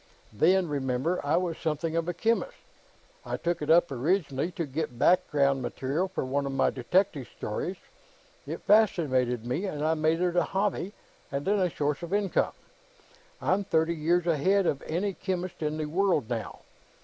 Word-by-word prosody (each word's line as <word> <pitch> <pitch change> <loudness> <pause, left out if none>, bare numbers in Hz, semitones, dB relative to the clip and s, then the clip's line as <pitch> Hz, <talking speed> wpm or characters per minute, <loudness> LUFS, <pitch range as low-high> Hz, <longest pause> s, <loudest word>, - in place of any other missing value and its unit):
Then, 180 - +3
remember, 140 +4 -1
I 145 - +2
was 175 -2 -2
something 160 0 -2
of 165 +1 0
a - - -1
chemist. 230 - 0 0.7
I - - -3
took 175 -1 -2
it 150 - -3
up, 170 -1 +5
originally, 145 +2 0
to 170 -2 -2
get 135 -3 -4
background 140 -3 +3
material 135 +8 -2
for 185 -7 -3
one 140 +2 -1
of - - -3
my - - +2
detective 145 +1 0
stories; 170 - -3 0.7
it - - -5
fascinated 130 - +3
me, 130 +11 -1
and 150 -5 -3
I 160 - +3
made 160 +1 +1
it 180 -1 0
a 175 - +5
hobby, 195 +1 -1 0.4
and 140 +1 -3
then 205 +1 +2
a 185 -1 +2
source 150 -1 -2
of 170 +3 -2
income. 205 -2 +1 0.9
I'm 195 +2 +2
thirty 165 -3 +1
years 170 +2 +1
ahead 180 +5 +2
of 140 -5 0
any 190 +5 -1
chemist 185 -2 -4
in 155 0 -1
the 155 - -2
world, 160 - +1
now. 115 -2 -4
165 Hz, 175 wpm, -28 LUFS, 140-185 Hz, 0.9 s, up